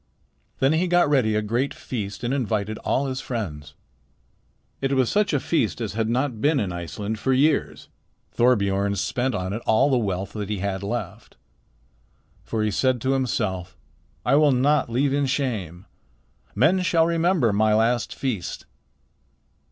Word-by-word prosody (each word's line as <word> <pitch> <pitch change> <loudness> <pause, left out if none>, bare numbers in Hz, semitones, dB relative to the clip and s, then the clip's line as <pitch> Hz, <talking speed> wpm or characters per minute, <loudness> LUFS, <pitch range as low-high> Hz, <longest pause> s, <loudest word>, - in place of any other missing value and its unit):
"Then 135 +3 +2
he 170 +3 +1
got 175 -4 +3
ready 115 -7 +2
a 105 - 0
great 120 +6 -1
feast 105 -3 -6
and 120 +2 -1
invited 110 -5 -1
all 140 - 0
his 130 -1 -3
friends. 75 - -5 1.1
It 135 0 0
was 130 -3 +2
such 210 0 +2
a 145 - +1
feast 130 -7 0
as 110 -4 -3
had 110 0 -1
not 125 -2 -1
been 145 -1 +3
in 100 -6 -2
Iceland 100 +5 -5
for 130 +5 +1
years. 145 +3 +1 0.4
Thorbiorn 100 -4 +2
spent 125 +6 -1
on 95 -1 -3
it 110 - -4
all 130 +6 +4
the 130 - +3
wealth 95 -3 -3
that 105 -2 -5
he 105 - -2
had 95 0 -3
left. 100 - -5 1.1
For 110 -1 -2
he 105 - 0
said 130 +4 +1
to 130 +2 +1
himself, 95 -9 -2 0.5
'I 125 +4 +4
will 150 -1 +5
not 135 +2 +2
leave 135 +4 +1
in 140 -1 +1
shame. 110 - -3 0.7
Men 185 +3 +3
shall 165 -2 +3
remember 165 - +2
my 105 +1 +3
last 115 +2 +1
feast.' 120 -10 -4
120 Hz, 160 wpm, -24 LUFS, 105-135 Hz, 1.1 s, will